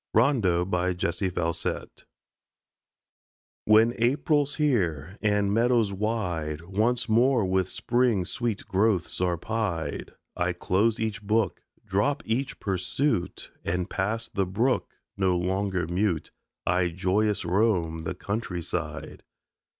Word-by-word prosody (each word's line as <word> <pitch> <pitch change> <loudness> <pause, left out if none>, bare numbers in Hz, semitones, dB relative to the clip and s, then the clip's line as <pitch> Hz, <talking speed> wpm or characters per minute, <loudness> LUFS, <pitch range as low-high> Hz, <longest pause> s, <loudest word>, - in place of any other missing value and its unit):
RONDEAU 90 -7 +2
JESSIE 90 +2 -1
FAUSET 85 -2 -3 1.6
When 110 +2 +5
April's 145 +4 +2
here 95 - 0
and 105 -1 +2
meadows 115 -2 +3
wide 90 -8 -2
Once 110 +7 0
more 120 0 +3
with 95 0 +1
spring's 120 -7 +1
sweet 115 -4 -2
growths 95 -3 +1
are 90 -1 +1
pied, 105 -4 -3 0.2
I 90 +1 0
close 105 +6 +1
each 110 0 -2
book, 110 +2 0 0.2
drop 135 +10 0
each 125 +5 -2
pursuit, 95 +3 -1
And 90 +1 -2
past 115 +4 -2
the 95 -2 0
brook, 115 +8 +1 0.3
no 95 -2 +2
longer 95 0 -1
mute, 90 -1 -1 0.3
I 90 0 +2
joyous 95 +3 0
roam 90 -3 +1
the 80 +3 -4
countryside. 95 -4 -4
100 Hz, 110 wpm, -27 LUFS, 90-115 Hz, 1.6 s, When